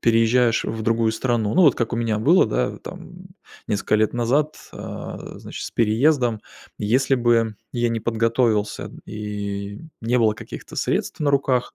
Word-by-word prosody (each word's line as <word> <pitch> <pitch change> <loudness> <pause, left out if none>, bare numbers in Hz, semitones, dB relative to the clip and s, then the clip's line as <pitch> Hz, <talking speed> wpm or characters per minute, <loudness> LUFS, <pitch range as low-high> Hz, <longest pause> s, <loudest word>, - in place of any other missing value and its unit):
переезжаешь 115 +1 +3
в 110 0 -3
другую 115 0 +2
страну- 115 -2 0
ну 185 - +5
вот 150 - +5
как 120 - -1
у - - 0
меня 115 -2 0
было, 165 +12 +5
да, 110 - -1
там - - -10 0.4
несколько 105 0 0
лет 110 0 +2
назад, 140 +6 +1 0.2
а, - - -7
значит, - - -7
с - - -5
переездом. 120 0 +2 0.4
Если 130 +6 +2
бы 115 -3 +2 0.2
я 120 -1 +1
не 115 -1 -2
подготовился, 115 -1 +1
м, - - -10
и 100 -1 -5 0.2
не 120 +2 +1
было 110 -2 +4
каких-то - - -9
средств - - -1
на 145 -1 +2
руках, 135 -3 +1
115 Hz, 165 wpm, -22 LUFS, 110-125 Hz, 0.4 s, ну